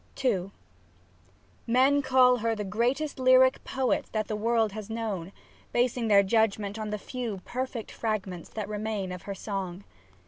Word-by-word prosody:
SAPPHO 215 -9 +1
II 195 - -14 1.2
Men 265 +4 +4
call 255 -2 +5
her 225 0 0
the 210 - -3
greatest 245 +9 -1
lyric 255 0 +5
poet 260 -2 0
that 215 -1 -1
the 215 - -2
world 225 0 +1
has 215 0 -7
known, 210 -6 -3 0.4
basing 240 -1 +1
their 200 -2 +6
judgment 210 0 +1
on 215 -1 -3
the 210 - -2
few 230 -2 -5
perfect 255 -2 -4
fragments 195 -6 -3
that 215 -2 -5
remain 210 -2 -3
of 180 -1 -6
her 200 - -3
song. 195 -2 -5
220 Hz, 160 wpm, -28 LUFS, 200-250 Hz, 1.2 s, their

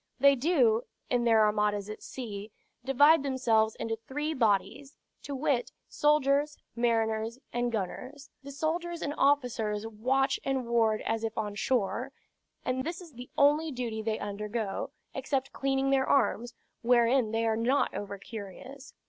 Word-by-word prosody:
"They 280 +1 +7
do, 250 -6 +3 0.3
in 245 -1 +2
their 225 -2 +5
armadas 210 -1 +1
at 215 - -7
sea, 215 -4 -7 0.3
divide 285 +4 +5
themselves 235 -5 +1
into 225 0 -3
three 295 +8 -4
bodies; 230 +3 0 0.3
to 285 - -5
wit, 265 -2 0 0.2
soldiers, 295 0 +2 0.2
mariners, 225 -1 0 0.2
and 240 0 0
gunners. 255 +7 -5
The 280 0 -9
soldiers 335 +4 -2
and 290 - -2
officers 230 -7 +1
watch 260 +5 0
and 265 -2 -1
ward 225 -2 +2
as 225 0 -1
if 225 0 -3
on 210 -1 -2
shore; 235 +3 -1 0.5
and 255 +1 -1
this 335 +4 -4
is 340 -5 -12
the 245 +1 -10
only 300 +3 +4
duty 235 -4 -3
they 220 0 -1
undergo, 205 0 -3 0.2
except 270 0 -2
cleaning 270 0 0
their 265 -1 +2
arms, 245 -3 +1 0.3
wherein 240 0 +3
they 225 +1 0
are 220 -1 +2
not 245 +5 +1
over 200 -1 -5
curious. 230 +7 -10
245 Hz, 150 wpm, -29 LUFS, 220-275 Hz, 0.5 s, They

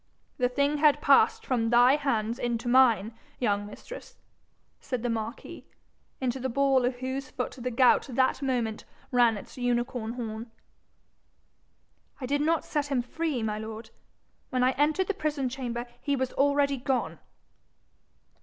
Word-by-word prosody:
The 250 -1 +2
thing 280 +3 +1
had 300 -1 +5
passed 450 0 +4
from 230 -3 0
thy 245 +3 +6
hands 235 -5 -1
into 235 0 -2
mine, 235 -4 +4 0.2
young 205 -4 0
mistress,' 485 - -11 0.6
said 250 -3 -4
the 240 - 0
marquis, 225 +1 -5 0.6
into 260 0 -2
the 260 +1 -2
ball 270 0 +2
of 250 0 0
whose 260 +1 -4
foot 250 - -4
the 250 +1 -2
gout 250 +3 +4
that 260 +2 +1
moment 240 -5 -1 0.3
ran 240 -3 +4
its 205 - -11
unicorn 240 -1 -1
horn. 230 -1 -6 1.7
'I 260 - -4
did 285 +3 0
not 320 +1 +1
set 290 -1 -1
him 265 -4 0
free, 290 -1 -2
my 215 -1 -2
lord. 220 +1 -8 0.6
When 255 -1 0
I 255 - +4
entered 300 +7 +1
the 405 - -1
prison 300 -7 -2
chamber, 245 -2 -4 0.2
he 285 -1 0
was 260 -1 -2
already 280 0 +2
gone.' 260 0 -2
255 Hz, 150 wpm, -28 LUFS, 235-280 Hz, 1.7 s, thy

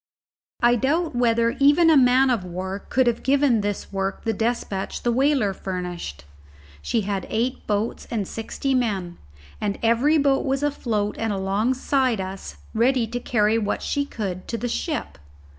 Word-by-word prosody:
I 240 0 +5
doubt 310 +5 0
whether 235 0 +2
even 295 +4 +5
a - - +6
man 260 0 +5
of 230 -6 0
war 185 +2 -5
could 260 +5 +1
have 240 -1 +1
given 270 -4 +3
this 205 0 -4
work 195 0 -2
the 225 - 0
despatch 220 -3 -2
the 240 - +2
whaler 260 -5 +2
furnished. 180 - -5 0.6
She 230 - 0
had 195 -2 -3
eight 245 +4 -2
boats 210 +2 -2
and 210 -5 -2
sixty 245 +4 -3
men, 195 -9 -1 0.4
and 205 -1 -1
every 240 +7 +3
boat 280 -2 +2
was 270 0 -1
afloat 225 -8 -1
and 225 -1 -1
alongside 230 +5 0
us 190 0 -6 0.2
ready 240 +2 +2
to 235 +2 -4
carry 220 -2 +2
what 205 -2 -2
she 285 - 0
could 195 -9 -5
to 230 - -3
the 245 - -3
ship. 300 +6 -3
230 Hz, 160 wpm, -23 LUFS, 200-260 Hz, 0.6 s, a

